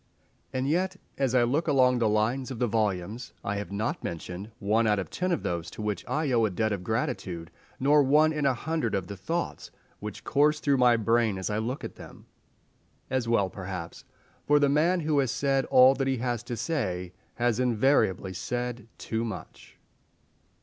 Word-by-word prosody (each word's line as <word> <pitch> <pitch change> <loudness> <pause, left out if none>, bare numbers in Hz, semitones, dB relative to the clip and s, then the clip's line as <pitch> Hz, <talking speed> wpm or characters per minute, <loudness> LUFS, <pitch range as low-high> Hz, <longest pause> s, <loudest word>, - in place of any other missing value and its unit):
And 130 0 -1
yet, 185 +5 +1 0.2
as 130 -2 +1
I 125 - +5
look 140 +8 0
along 125 -3 +4
the 115 -2 +2
lines 115 +5 0
of 130 - -5
the 125 - +1
volumes, 105 +1 -2
I 100 0 -2
have 100 -1 -5
not 105 +3 -2
mentioned 90 +4 -6
one 110 +2 +2
out 105 -1 +3
of 95 - -4
ten 185 0 -1
of 170 - -1
those 85 -1 -2
to 110 - -9
which 105 -4 -2
I 150 -2 0
owe 115 -2 +3
a - - +1
debt 110 +4 -1
of 95 -3 -4
gratitude, 110 - -3 0.3
nor 145 +3 +5
one 150 +3 +4
in 150 -2 +1
a 130 - +2
hundred 155 -4 -1
of 95 -2 -1
the 100 - -7
thoughts 165 - -3 0.3
which 105 -1 -7
course 150 +2 +3
through 140 -2 +2
my 125 -2 +5
brain 115 -2 +2
as 95 +2 -3
I 105 - 0
look 125 +5 -3
at - - -7
them. - - -12 0.9
As 130 -3 0
well 100 -5 +2
perhaps, 90 -3 -7 0.4
for 150 - +5
the 145 -1 +3
man 165 +5 +2
who 150 -2 +1
has 135 -3 +1
said 135 +2 +1
all 130 +1 +7
that 135 0 -1
he 135 -1 +1
has 120 -1 -2
to 120 -1 -4
say 95 - -2 0.2
has 120 -1 +1
invariably 115 -6 +2
said 120 +3 -4
too 110 0 -3
much. 110 -5 -8
120 Hz, 195 wpm, -28 LUFS, 105-135 Hz, 0.9 s, all